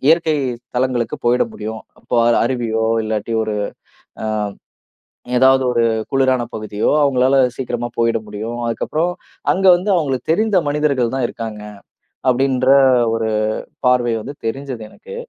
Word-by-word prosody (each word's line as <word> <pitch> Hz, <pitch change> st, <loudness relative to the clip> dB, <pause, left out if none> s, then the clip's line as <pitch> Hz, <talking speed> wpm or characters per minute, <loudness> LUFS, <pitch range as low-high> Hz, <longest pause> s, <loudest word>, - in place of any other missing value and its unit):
இயற்கை 160 Hz, -1 st, +4 dB, 0.4 s
தலங்களுக்கு 125 Hz, -1 st, 0 dB
போயிட 120 Hz, +1 st, +4 dB
முடியும். 110 Hz, -, -6 dB, 0.2 s
அப்போ 125 Hz, -, -3 dB, 0.3 s
அருவியோ, 115 Hz, -3 st, -1 dB, 0.2 s
இல்லாட்டி 110 Hz, +1 st, -3 dB
ஒரு 110 Hz, -1 st, -3 dB, 0.7 s
அ -, -, -2 dB, 1.1 s
ஏதாவது 130 Hz, +1 st, +5 dB
ஒரு 120 Hz, -1 st, +2 dB, 0.3 s
குளிரான 130 Hz, -2 st, +2 dB
பகுதியோ 105 Hz, -1 st, -1 dB
அவுங்களால 135 Hz, -1 st, +3 dB, 0.2 s
சீக்கிரமா 120 Hz, -2 st, -3 dB
போயிட 115 Hz, -1 st, +2 dB
முடியும். 110 Hz, +3 st, -5 dB
அதுக்கு 115 Hz, -, -2 dB
அப்புறம், 165 Hz, +3 st, 0 dB, 0.4 s
அங்க 195 Hz, +1 st, 0 dB
வந்து 180 Hz, +4 st, -2 dB
அவுங்களுக்கு 140 Hz, -7 st, -1 dB
தெரிந்த 210 Hz, +4 st, +2 dB
மனிதர்கள் 140 Hz, -5 st, +1 dB
தான் 135 Hz, -2 st, 0 dB
இருக்காங்க. 110 Hz, -3 st, -7 dB, 0.7 s
அப்படின்ற 130 Hz, 0 st, +2 dB, 0.5 s
ஒரு 115 Hz, -1 st, -1 dB, 0.6 s
பார்வை 125 Hz, -2 st, +3 dB
வந்து 140 Hz, -, -7 dB
தெரிஞ்சது 130 Hz, 0 st, -4 dB
எனக்கு. 475 Hz, +1 st, -11 dB
125 Hz, 125 wpm, -18 LUFS, 115-140 Hz, 1.1 s, ஏதாவது